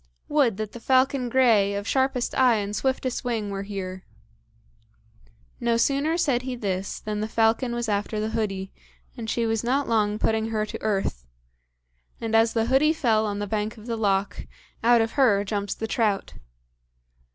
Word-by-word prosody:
"Would 270 Hz, -9 st, +2 dB
that 215 Hz, -1 st, -4 dB
the 235 Hz, -, -9 dB
falcon 260 Hz, +1 st, +2 dB
grey, 225 Hz, -6 st, +3 dB
of 200 Hz, +1 st, -4 dB
sharpest 265 Hz, -2 st, 0 dB
eye 255 Hz, -3 st, +4 dB
and 205 Hz, -1 st, -2 dB
swiftest 260 Hz, 0 st, -1 dB
wing 225 Hz, -5 st, -2 dB
were 195 Hz, 0 st, -3 dB
here!" 190 Hz, -2 st, -6 dB, 1.6 s
No 235 Hz, -1 st, +1 dB
sooner 280 Hz, +7 st, +1 dB
said 275 Hz, -8 st, +1 dB
he 255 Hz, 0 st, -4 dB
this 195 Hz, -4 st, -3 dB
than 210 Hz, -1 st, -4 dB
the 215 Hz, -, -2 dB
falcon 230 Hz, +2 st, +1 dB
was 240 Hz, -1 st, -2 dB
after 210 Hz, +1 st, -1 dB
the 215 Hz, +1 st, -2 dB
hoodie, 195 Hz, -4 st, -3 dB, 0.4 s
and 230 Hz, -3 st, -6 dB
she 235 Hz, +1 st, 0 dB
was 225 Hz, 0 st, 0 dB
not 270 Hz, +4 st, 0 dB
long 210 Hz, -2 st, +1 dB
putting 220 Hz, 0 st, 0 dB
her 215 Hz, -1 st, -1 dB
to -, -, -7 dB
earth; 195 Hz, -, -2 dB, 0.9 s
and 225 Hz, -1 st, -2 dB
as 225 Hz, 0 st, +4 dB
the 225 Hz, -1 st, +1 dB
hoodie 270 Hz, +6 st, +3 dB
fell 225 Hz, -8 st, +1 dB
on 205 Hz, -1 st, -3 dB
the 205 Hz, -, -2 dB
bank 215 Hz, +2 st, -3 dB
of 215 Hz, -, -12 dB
the 235 Hz, -1 st, -2 dB
loch, 200 Hz, -2 st, -1 dB, 0.4 s
out 235 Hz, 0 st, +5 dB
of 225 Hz, 0 st, -1 dB
her 225 Hz, -8 st, +3 dB
jumps 205 Hz, -1 st, -3 dB
the 225 Hz, -, -4 dB
trout. 220 Hz, -3 st, 0 dB
225 Hz, 175 wpm, -25 LUFS, 205-245 Hz, 1.6 s, out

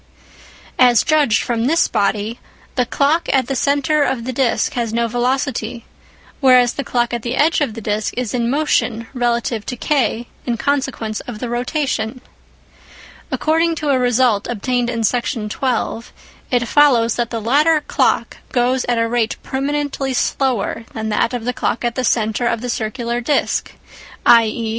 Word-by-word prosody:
As 245 Hz, -2 st, +5 dB
judged 300 Hz, -8 st, +2 dB
from 235 Hz, -1 st, -1 dB
this 330 Hz, +4 st, +3 dB
body, 205 Hz, +3 st, -1 dB, 0.3 s
the 250 Hz, -2 st, 0 dB
clock 300 Hz, +6 st, +1 dB
at 265 Hz, -2 st, +2 dB
the 270 Hz, -, -3 dB
centre 285 Hz, +3 st, +1 dB
of 265 Hz, -4 st, 0 dB
the 255 Hz, +2 st, -4 dB
disc 250 Hz, -2 st, +1 dB
has 235 Hz, -3 st, -2 dB
no 235 Hz, +1 st, 0 dB
velocity, 245 Hz, -1 st, -2 dB, 0.5 s
whereas 255 Hz, -3 st, +5 dB
the 280 Hz, -, -4 dB
clock 240 Hz, -2 st, -1 dB
at 240 Hz, -, -2 dB
the 240 Hz, +2 st, -3 dB
edge 310 Hz, +3 st, +2 dB
of 230 Hz, -7 st, -1 dB
the 225 Hz, -, -6 dB
disc 210 Hz, 0 st, -1 dB
is 250 Hz, -4 st, -2 dB
in 235 Hz, -2 st, 0 dB
motion 250 Hz, -5 st, 0 dB
relative 235 Hz, -3 st, -1 dB
to 250 Hz, -, -4 dB
K 240 Hz, -4 st, 0 dB, 0.2 s
in 240 Hz, -2 st, -2 dB
consequence 265 Hz, -5 st, -1 dB
of 245 Hz, -3 st, -6 dB
the 240 Hz, +2 st, -5 dB
rotation. 250 Hz, -1 st, -2 dB, 1.1 s
According 325 Hz, +2 st, +1 dB
to 300 Hz, -2 st, -3 dB
a 265 Hz, -2 st, +3 dB
result 245 Hz, -4 st, +2 dB
obtained 245 Hz, +2 st, -1 dB
in 230 Hz, -2 st, -2 dB
Section 235 Hz, -1 st, -1 dB
12, 235 Hz, -1 st, -2 dB, 0.4 s
it 240 Hz, -2 st, +1 dB
follows 240 Hz, -5 st, +4 dB
that 240 Hz, -1 st, -1 dB
the 230 Hz, -, -3 dB
latter 295 Hz, +8 st, +3 dB
clock -, -, 0 dB
goes 250 Hz, +1 st, +1 dB
at 240 Hz, -1 st, 0 dB
a 230 Hz, 0 st, +1 dB
rate 230 Hz, -1 st, 0 dB
permanently 275 Hz, -1 st, -2 dB
slower 245 Hz, -4 st, 0 dB
than 220 Hz, -1 st, -3 dB
that 215 Hz, +2 st, +1 dB
of 245 Hz, -3 st, -4 dB
the 250 Hz, -, -1 dB
clock 235 Hz, 0 st, -2 dB
at 240 Hz, -, 0 dB
the 255 Hz, -, -2 dB
centre 220 Hz, 0 st, +1 dB
of 230 Hz, -, -1 dB
the 245 Hz, -1 st, -2 dB
circular 235 Hz, +2 st, -3 dB
disc, 285 Hz, +5 st, 0 dB, 0.5 s
i.e. 230 Hz, -1 st, +4 dB
245 Hz, 165 wpm, -18 LUFS, 230-270 Hz, 1.1 s, As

